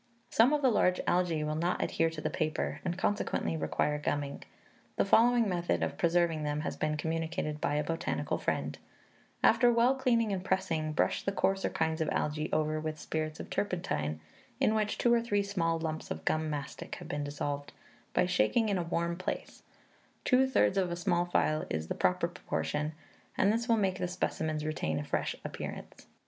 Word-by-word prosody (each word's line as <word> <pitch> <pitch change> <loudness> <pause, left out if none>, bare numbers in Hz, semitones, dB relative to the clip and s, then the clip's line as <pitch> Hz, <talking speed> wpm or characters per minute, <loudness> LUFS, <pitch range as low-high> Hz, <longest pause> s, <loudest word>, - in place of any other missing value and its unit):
"Some 235 +5 +5
of 295 -1 +1
the 260 - +5
large 180 -4 +3
algae 175 -4 +1
will 150 0 -1
not 170 +3 0
adhere 165 0 +1
to 160 -1 -7
the - - -2
paper, 155 -2 -2
and 175 -1 -2
consequently 205 -4 0
require 150 -1 0
gumming. 145 -1 -2 0.5
The - - +2
following 235 +3 +5
method 175 -2 0
of - - -2
preserving 170 -2 +2
them 150 0 -1
has - - -3
been 155 0 -1
communicated 160 -1 -2
by 145 - +1
a 150 - +1
botanical 165 +2 -2
friend: - - -2 0.6
'After 245 -1 +6
well 235 +2 +4
cleaning 235 -5 +2
and 185 -1 -2
pressing, 170 -5 0
brush - - +1
the 195 - -1
coarser 195 0 +1
kinds 160 0 -1
of 155 - +1
algae 150 +1 -1
over 155 0 +1
with 155 -1 -4
spirits 155 0 -3
of - - -8
turpentine, 80 - -1 0.4
in 215 - +3
which 215 -1 0
two 240 - +3
or 235 - +4
three 205 -3 +1
small 170 -5 0
lumps 160 -1 -4
of 80 0 -5
gum 155 0 +1
mastic 145 -3 -5
have - - -9
been 145 0 -2
dissolved, 145 0 -3 0.4
by - - +4
shaking 180 - +2
in 195 -2 +1
a - - +1
warm 170 0 -1
place; 185 - -5 0.6
two 260 +1 +4
thirds 230 -6 +3
of 185 -2 +1
a 175 - -2
small 175 0 +1
phial 155 -3 +1
is 80 +1 -3
the - - 0
proper 90 0 +1
proportion, 150 +1 -3 0.4
and 200 +2 +4
this 235 +2 -2
will 230 - +5
make 190 -3 0
the 180 - 0
specimens 155 -3 -2
retain 80 - -1
a 75 - -2
fresh - - -1
appearance.'" - - -7
165 Hz, 190 wpm, -31 LUFS, 155-195 Hz, 0.6 s, After